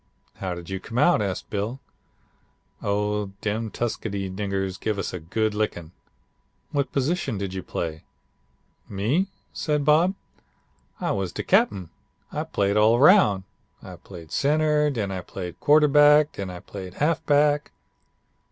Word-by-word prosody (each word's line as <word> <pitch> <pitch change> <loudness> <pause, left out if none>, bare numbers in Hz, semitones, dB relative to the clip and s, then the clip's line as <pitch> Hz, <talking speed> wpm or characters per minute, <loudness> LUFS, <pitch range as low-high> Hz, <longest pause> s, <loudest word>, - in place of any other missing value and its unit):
"'How 95 -2 -3
did 85 -1 -9
you 95 - -2
come 115 +5 -7
out?' 175 -2 +4
asked 95 -3 -3
Bill. 105 +6 -3 1.0
"'Oh, 105 0 -1
dem 110 +2 -2
Tuskegee 100 -4 -3
niggers 95 -1 -3
give 110 -2 -2
us 100 - -3
a 90 - -4
good 110 +7 -1
lickin'.' 95 -6 -3 0.8
"'What 140 -1 -1
position 140 - -1
did 95 -1 -4
you 95 - -4
play?' 80 -3 -4 0.9
"'Me?' 120 - 0 0.3
said 150 -2 -1
Bob, 165 +6 +4 0.9
'I - - 0
was 95 -3 -2
de - - -4
cap'en. 95 -5 +2 0.4
I - - -3
played 100 +1 0
all 110 +2 +5
roun'. 135 - +6 0.4
I - - -9
played 85 -5 -12
center. 150 +1 +2
Den 110 -8 -2
I 95 -1 -3
played 90 -1 -7
quarterback. 150 0 +5
Den 100 -2 -6
I 90 -1 -8
played 95 -3 -9
halfback.' 150 -1 +2
105 Hz, 140 wpm, -25 LUFS, 95-145 Hz, 1.0 s, roun